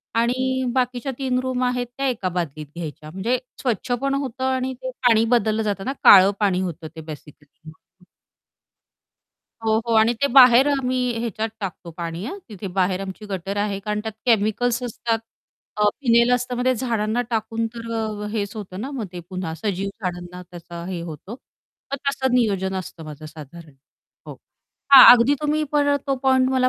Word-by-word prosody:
आणि 255 +3 +1
बाकीच्या 250 +1 -1
3 255 -2 0
रूम 255 -1 -2
आहेत 250 -1 -1
त्या 275 0 0
एका 220 -7 -2
बादलीत 160 -4 -4
घ्यायच्या 155 -2 -7
म्हणजे 210 +8 -1 0.2
स्वच्छ 245 -1 -2
पण 275 0 0
होतं 265 -2 -4
आणि 260 0 -1
ते 260 - -4 0.2
पाणी 225 -1 +4
बदललं 220 -1 +1
जातं 200 -2 -2
ना. 270 - -1
काळं 195 0 +9
पाणी 195 -3 +1
होतं 170 -3 -5
ते 160 - -7
बेसिकली 150 -1 -11 0.2
म्हणून. 180 +3 -21 1.6
हो, 220 0 +2
हो. 230 - +1
आणि 220 +2 +5
ते - - +5
बाहेर 255 0 +8
आम्ही 260 -3 0 0.2
ह्याच्यात 225 -1 -2
टाकतो 180 -3 -6
पाणी, 170 +1 -5
हां. 390 - -6
तिथे 205 -3 -8
बाहेर 185 0 +1
आमची 195 +2 -7
गटर 195 +1 -4
आहे 205 -1 -1
कारण 210 +1 -2
त्यात 220 - -4
केमिकल्स 230 +2 +2
असतात 230 -1 -2 0.6
अ, 210 - 0 0.2
फिनाइल 235 -2 +4
असतं 250 0 0
मग 245 - -2
ते 255 0 +3
झाडांना 230 -2 -1
टाकून 225 0 -1
तर 230 0 -7
अ 225 - -1 0.2
अ, - - -3
हेच 210 -1 -3
होतं 190 -3 -7
ना, 260 +5 -5
मग 255 -7 -4
ते 175 - -6
पुन्हा 185 -3 -4
सजीव 195 +3 -3
झाडांना 180 0 -5
त्याचा 170 -1 -10
हे 180 -2 -4
होतो, 165 +4 -8 0.6
मग - - +1
तसं 265 -2 0
नियोजन 195 -6 +1
असतं 175 -3 -7
माझं 155 0 -9
साधारण. 155 +1 -12 0.5
हो. - - -7 0.6
हां, 270 - +12
अगदी 250 +4 +3
तुम्ही 300 +1 +1
पर 285 -1 +3
तो 275 - +1
पॉइंट 260 -1 +4
मला 255 -1 +3
220 Hz, 180 wpm, -22 LUFS, 185-250 Hz, 1.6 s, हां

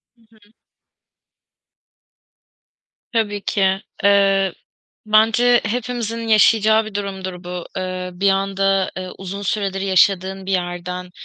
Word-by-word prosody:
Hı 235 - -30
hı. 220 - -24 2.7
Tabii 205 -3 0
ki. 190 -1 +1 0.2
Eee, 195 -2 +3 0.5
bence 225 +3 +4
hepimizin 230 0 -3
yaşayacağı 220 0 +4
bir 215 -1 -9
durumdur 190 -3 -5
bu: 180 0 -6
ııı, 185 -1 -4
bir 200 - +4
anda, 195 0 +1
ııı, 185 0 -6
uzun 195 +1 -6
süredir 195 -1 -2
yaşadığın 190 0 +1
bir 195 - -2
yerden, 180 0 -3
195 Hz, 105 wpm, -20 LUFS, 185-215 Hz, 2.7 s, bence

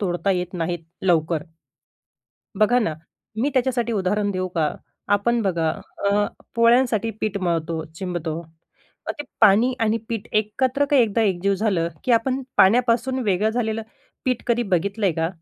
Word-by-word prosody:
तोडता 180 -1 0
येत 180 0 -3
नाहीत 175 0 -2 0.2
लवकर. 165 -3 +2 1.2
बघा 240 +4 +5
ना, 165 -10 0 0.5
मी 280 +5 +1
त्याच्यासाठी 245 -2 +1
उदाहरण 205 +1 0
देऊ 185 -1 -2
का, 155 -2 +1 0.3
आपण 230 +4 +2
बघा 170 -5 0 0.4
अ, 205 0 +2 0.3
पोळ्यांसाठी 230 -1 +3
पीठ 215 -2 -1
मळतो, 165 -3 -1
चिंबतो 170 -3 -4 0.7
मग - - 0
ते 295 - -4 0.2
पाणी 225 +4 +5
आणि 225 0 +2
पीठ 225 -1 -4
एकत्र 255 +6 +1
काय 285 -3 +5
एकदा 225 0 +1
एकजीव 195 -1 +1
झालं, 190 -5 0 0.2
की 250 - +2
आपण 260 +3 +1
पाण्यापासून 240 +5 +3
वेगळं 205 +2 +2
झालेलं 225 -1 -1 0.4
पीठ 255 -2 0
कधी 240 0 +2
बघितलंय 195 0 0
का? 165 +1 -1
205 Hz, 145 wpm, -23 LUFS, 180-235 Hz, 1.2 s, बघा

